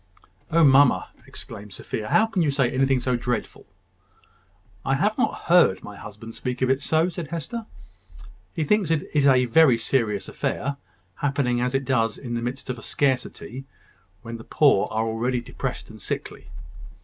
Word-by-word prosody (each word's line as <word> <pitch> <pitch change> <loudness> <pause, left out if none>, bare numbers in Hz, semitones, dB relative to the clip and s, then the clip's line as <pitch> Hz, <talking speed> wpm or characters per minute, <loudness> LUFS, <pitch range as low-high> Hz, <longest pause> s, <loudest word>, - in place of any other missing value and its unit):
"Oh, 165 +1 +4
mamma," 140 -2 +5 0.2
exclaimed 100 0 -8
Sophia, 105 -1 -5
"how 220 - +5
can 225 -5 -1
you 155 - +2
say 135 -3 +1
anything 135 0 +2
so 125 0 0
dreadful?" 120 0 -3 1.2
"I 135 - +1
have 210 +10 +1
not 250 - -1
heard 170 - +4
my 105 - -9
husband 105 +3 -10
speak 125 +2 -3
of 130 - +3
it 135 +1 +1
so," 160 +2 +2
said 170 -3 -5
Hester. 170 +9 -5 0.8
"He 160 - -2
thinks 195 +2 +2
it 160 -2 +1
a 135 -4 +4
very 125 0 +5
serious 115 -4 0
affair, 140 +1 -3 0.4
happening 135 -4 0
as 125 +2 0
it 135 0 0
does 115 -4 +1
in 120 -3 -6
the 120 - -1
midst 125 +3 -4
of 125 - -6
a - - -11
scarcity, 130 0 -2 0.6
when 115 0 -6
the 115 - -11
poor 140 -8 +3
are 110 +1 -1
already 120 +3 -1
depressed 120 - -5
and - - -13
sickly." - - -5
130 Hz, 170 wpm, -24 LUFS, 120-150 Hz, 1.2 s, mamma